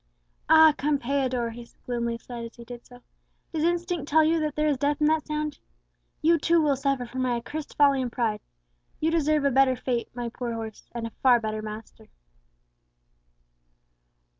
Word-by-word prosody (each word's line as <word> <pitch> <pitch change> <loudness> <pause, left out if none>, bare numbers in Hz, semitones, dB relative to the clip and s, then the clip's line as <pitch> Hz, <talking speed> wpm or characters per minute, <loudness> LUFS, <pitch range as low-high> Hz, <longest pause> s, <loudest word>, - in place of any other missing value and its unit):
"Ah! 315 -1 +8
Campeador," 265 -4 0
he 235 +1 -11 0.2
gloomily 235 -1 -2
said 235 0 -8
as 230 - -9
he 235 - -12
did 240 0 -9
so, 245 0 -16 0.5
"does 315 -1 -1
instinct 345 -2 -1
tell 315 +1 +5
you 325 +1 +2
that 305 -2 -2
there 300 0 +1
is 290 -3 +1
death 290 +3 0
in 300 - +2
that 310 0 +1
sound? 300 -1 -3 0.6
You 330 +1 +4
too 335 +2 +3
will 295 -3 +2
suffer 275 -2 -1
from 255 +2 -5
my 250 -1 +1
accursed 290 +6 -6
folly 280 -2 +4
and 250 -2 -3
pride. 220 -4 -1 0.6
You 320 +1 +1
deserve 305 -2 +2
a 280 - +3
better 265 0 +4
fate, 245 -1 -2
my 240 -1 -3
poor 235 0 -5
horse, 220 -2 -8
and 235 -1 -4
a 230 - -6
far 250 -2 +5
better 215 -1 -3
master!" 215 +1 -9
270 Hz, 180 wpm, -26 LUFS, 235-305 Hz, 0.6 s, Ah